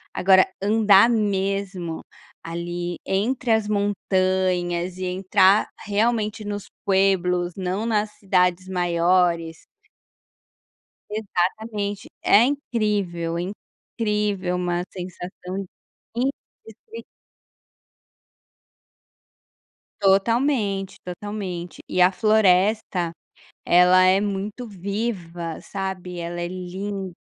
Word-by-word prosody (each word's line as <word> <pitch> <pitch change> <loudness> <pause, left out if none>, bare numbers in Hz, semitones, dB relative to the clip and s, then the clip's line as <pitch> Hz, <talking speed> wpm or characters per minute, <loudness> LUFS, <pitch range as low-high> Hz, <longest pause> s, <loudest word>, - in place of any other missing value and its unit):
Agora, 190 0 +5 0.2
andar 210 0 +5
mesmo 195 -5 -1 0.4
ali, 175 +1 -4
entre 235 +5 0
as 220 -2 +2
montanhas 185 -3 0
e 185 - -3
entrar 190 +2 +3 0.2
realmente 215 0 0
nos 205 -1 -5 0.2
pueblos, 180 -3 +2
não 190 +3 -2
nas 215 -2 0
cidades 185 -2 +1
maiores 175 -2 +1 1.4
Exatamente. 205 0 -2
É 210 - +6
incrível, 210 -11 -1
incrível 205 0 -3
uma 175 -1 -1
sensação 185 +1 -7 0.5
indescri 230 -3 -6 3.0
Totalmente, 200 0 +1
totalmente. 180 -2 -6
E 180 - +2
a 180 - +5
floresta, 195 -3 +2 0.5
ela 180 +1 +6
é 185 +1 +5
muito 205 +4 -3
viva, 185 -5 -4
sabe, 190 -2 -5
ela 170 0 -4
é 175 - -2
lin 185 +1 -5
190 Hz, 80 wpm, -23 LUFS, 180-210 Hz, 3.0 s, É